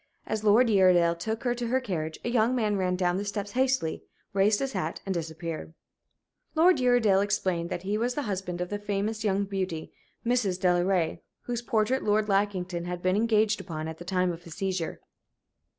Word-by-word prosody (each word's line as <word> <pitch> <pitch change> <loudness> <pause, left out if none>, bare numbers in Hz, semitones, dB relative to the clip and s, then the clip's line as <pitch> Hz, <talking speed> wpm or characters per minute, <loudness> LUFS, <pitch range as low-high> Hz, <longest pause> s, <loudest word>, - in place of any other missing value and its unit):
As 215 -1 -3
Lord 220 +4 +5
Uredale 185 -5 +5
took 220 +6 -4
her 245 -1 +1
to 240 -1 -3
her 255 +3 +2
carriage 165 -10 -3
a - - 0
young 240 +1 +2
man 215 -4 +1
ran 185 -2 0
down 180 -1 +1
the 200 - -2
steps 205 0 -4
hastily, 255 -8 0 0.3
raised 200 +2 +3
his 270 +1 -2
hat, 170 -4 -3
and 195 - -1
disappeared. 160 -1 -5 0.8
Lord 345 +3 +5
Uredale 240 -6 +4
explained 185 -4 0
that 175 - -4
he 205 +2 -1
was 245 +2 0
the 290 - -1
husband 185 -5 -3
of 180 - -3
the 205 - -3
famous 205 +2 -2
young 200 -1 +1
beauty, 185 -5 -4 0.3
Mrs. 230 -7 +1
Delaray, 180 -1 +2 0.2
whose 240 -1 -3
portrait 235 +2 +1
Lord 210 0 +2
Lackington 185 -3 0
had 175 0 -5
been 185 +1 +2
engaged 215 -1 +2
upon 160 -3 -5
at 160 0 -7
the - - -7
time 180 0 +1
of 170 0 -7
his 170 -3 -10
seizure. 185 -4 -3
195 Hz, 190 wpm, -28 LUFS, 180-220 Hz, 0.8 s, Lord